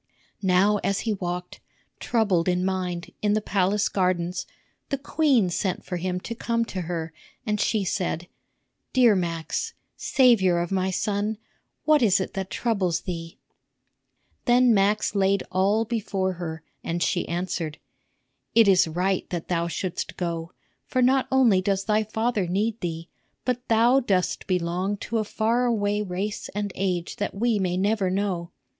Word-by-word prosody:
Now 195 +2 +3
as 200 - 0
he 225 - 0
walked, 180 -2 -5 0.4
troubled 200 -8 +1
in 180 0 +1
mind, 180 -2 -2
in 210 -1 +2
the 215 - +3
palace 200 0 +1
gardens, 180 -2 -1 0.4
the 275 - 0
queen 270 - +2
sent 185 +1 -2
for 180 - -3
him 180 +1 -2
to 230 - -5
come 230 0 -1
to 185 - -2
her, 165 -2 -3 0.3
and 210 -1 0
she 215 -3 +1
said: 175 -2 -2 0.7
"Dear 245 -5 +6
Max, 165 -3 -2 0.2
savior 230 -10 +4
of 170 +1 -2
my 190 -1 +1
son, 205 +3 -1 0.5
what 305 -2 +4
is 200 -5 +4
it 190 - -3
that 190 -1 -4
troubles 190 -8 0
thee?" 165 -2 -6 1.1
Then 245 0 +5
Max 205 +1 +2
laid 195 -1 +2
all 200 +4 +2
before 200 -5 -1
her, 160 -3 -6 0.2
and 170 +1 -1
she 175 - 0
answered: 170 -3 -3 0.8
"It 225 -2 +7
is 190 -2 +5
right 180 +4 -1
that 170 -2 -4
thou 170 -1 0
shouldst 180 +1 -4
go, 170 -1 -3 0.4
for 255 -1 +1
not 260 +1 +3
only 240 -8 +5
does 195 0 0
thy 215 0 +2
father 220 -2 -1
need 210 +5 -1
thee, 165 -1 -4 0.4
but 250 0 -2
thou 235 +4 +5
dost 195 -8 0
belong 180 +2 0
to 225 +3 -2
a - - +1
far 230 +4 +1
away 210 -3 +1
race 200 +1 -3
and 205 -1 -2
age 180 -3 -2
that 205 - -3
we 225 +1 +1
may 180 -2 0
never 200 0 +1
know. 185 -3 -1
195 Hz, 155 wpm, -25 LUFS, 180-220 Hz, 1.1 s, It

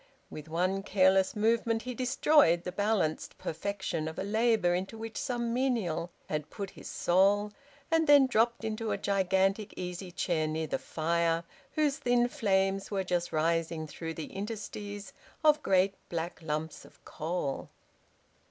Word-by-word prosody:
With 155 +1 -8
one 185 +4 0
careless 190 -1 +3
movement 225 +1 +1
he 250 - -4
destroyed 250 - +4
the 180 - -4
balanced 205 -5 0
perfection 175 -2 -3
of 160 - -6
a - - -2
labour 220 -3 +2
into 190 +5 -3
which 225 0 -7
some 235 -2 -2
menial 230 -10 0 0.2
had 150 -1 -3
put 200 -3 -6
his - - -10
soul, 200 +4 +3 0.4
and 325 -1 +3
then 285 -2 +8
dropped 235 -1 +1
into 220 0 -2
a - - 0
gigantic 195 +1 +1
easy 180 0 -5
chair 165 -3 0
near 160 +1 -2
the - - -2
fire, 165 +1 0 0.3
whose 300 -2 +1
thin 245 -3 +3
flames 195 -3 +1
were 195 -2 -1
just 175 -1 -1
rising 165 0 0
through 160 +2 -6
the 160 - -7
interstices 205 0 -6 0.3
of 305 -1 +5
great 190 -2 +3 0.2
black 170 +1 -4
lumps 155 0 -4
of - - -19
coal. 160 -3 -3
195 Hz, 150 wpm, -30 LUFS, 170-225 Hz, 0.4 s, then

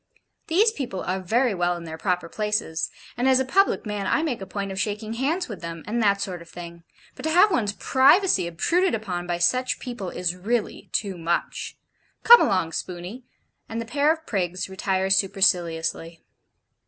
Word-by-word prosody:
'These 410 +8 +4
people 250 - -5
are 185 +2 -2
very 230 +6 +1
well 175 -1 0
in 170 - -9
their 160 -1 -7
proper 175 0 -1
places, 210 -5 -2 0.3
and 250 +2 +1
as 260 0 +5
a 265 - 0
public 390 +5 +2
man, 205 -2 -3
I 310 - +1
make 255 -10 -2
a 195 - -6
point 200 -1 -4
of 190 - -4
shaking 210 +2 -3
hands 295 +10 -1
with 210 -6 -8
them, 165 -1 -7
and 235 +3 -1
that 200 -2 +3
sort 180 -3 -4
of 170 - -14
thing; 170 -1 -10 0.3
but - - -11
to 315 - -1
have 360 +6 +5
one's 210 - 0
privacy 270 - +3
obtruded 345 - +1
upon 180 -5 -4
by 175 -1 -1
such 255 +9 +1
people 240 -7 -6
is 180 0 -2
really 215 +5 -3
too 195 -4 -2
much. 170 +1 -2 0.5
Come 475 0 +9
along, 185 -4 +1
Spooney,' 180 +9 -6 0.4
and 225 - -4
the 230 - -4
pair 285 +6 +2
of 320 0 -4
prigs 185 -3 -2
retire 190 0 -1
superciliously. 170 -4 +1
200 Hz, 185 wpm, -24 LUFS, 175-255 Hz, 0.5 s, Come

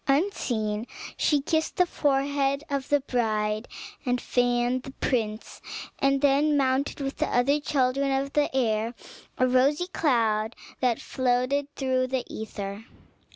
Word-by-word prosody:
Unseen 240 - 0 0.3
she 295 - +2
kissed 315 +2 0
the 360 - +4
forehead 280 -2 +1
of 275 -1 -2
her 290 -1 +3
bride, 215 -4 -1 0.4
and 250 -3 0
fanned 245 +1 +1
the 270 - -9
prince, 220 -5 -2 0.4
and 275 0 +2
then 290 +1 +3
mounted 270 +1 +1
with 270 0 -3
the - - 0
other 275 +4 +2
children 275 -1 +1
of 270 +1 -1
the 295 -1 +2
air 225 -2 +1 0.4
to - - +2
a - - +5
rosy 275 +6 +3
cloud 230 -10 +1 0.2
that 245 -3 +1
floated 255 +2 0
through 260 -1 +1
the 260 -1 -2
aether. 205 -1 -6
260 Hz, 140 wpm, -26 LUFS, 240-280 Hz, 0.4 s, a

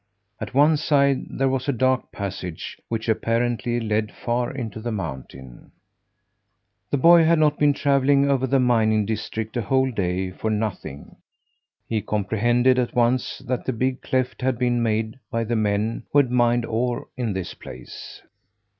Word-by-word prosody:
At - - -7
one 150 +3 +5
side 140 -3 +2
there 135 - 0
was 130 +1 -1
a - - +4
dark 130 0 0
passage, 95 -4 -6
which 115 0 -3
apparently 120 +1 0
led 110 -1 -1
far 120 0 -2
into 115 -5 -6
the 120 +2 -4
mountain. 65 - -7 1.2
The 145 - +1
boy 170 +4 +7
had 165 +1 +4
not 150 -1 +2
been 145 -1 +4
travelling 140 0 +2
over 135 -2 +1
the 135 +1 +2
mining 110 -4 +2
districts 110 +1 -4
a - - 0
whole 130 +5 +1
day 95 -3 -2
for 110 +4 -4
nothing. 105 -10 -4 0.7
He 110 -2 -1
comprehended 115 +5 +1
at 120 -1 -2
once 120 +1 0
that 125 -1 -2
the 130 - -1
big 130 +3 -1
cleft 130 0 -2
had 130 -1 0
been 120 -1 +1
made 110 +1 -1
by 115 -2 -1
the 115 +1 -2
men 105 +1 0
who - - +2
had 135 -4 +4
mined 120 -1 +2
ore 120 +2 -2
in 120 -5 -2
this 95 -2 -4
place. - - -11
120 Hz, 165 wpm, -23 LUFS, 110-130 Hz, 1.2 s, boy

